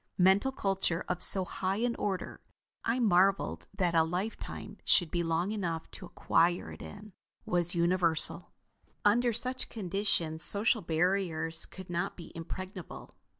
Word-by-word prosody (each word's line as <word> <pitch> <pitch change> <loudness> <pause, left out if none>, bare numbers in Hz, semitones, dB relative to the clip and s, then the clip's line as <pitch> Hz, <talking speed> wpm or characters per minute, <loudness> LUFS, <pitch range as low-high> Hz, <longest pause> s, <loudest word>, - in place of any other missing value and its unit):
Mental 190 +8 +3
culture 195 -8 -2
of 180 -1 -3
so 190 -2 +7
high 190 +1 -3
an 235 +2 -1
order 190 -3 -4 0.4
I 230 +2 0
marveled 195 -3 +1
that 180 -4 0
a 165 - +4
lifetime 180 +7 -6
should 175 -4 +5
be 175 - -1
long 170 +3 -1
enough 170 -6 -4
to - - -8
acquire 175 +1 0
it - - -11
in 210 0 -11 0.3
was 175 0 +1
universal. 170 -1 +1 0.5
Under 240 +4 +3
such 255 +3 -2
conditions 180 -5 +1
social 210 +6 +2
barriers 165 -1 0
could 185 -1 -11
not 175 +3 -3
be 170 - -11
impregnable. 185 +2 -8
185 Hz, 140 wpm, -30 LUFS, 170-205 Hz, 0.5 s, so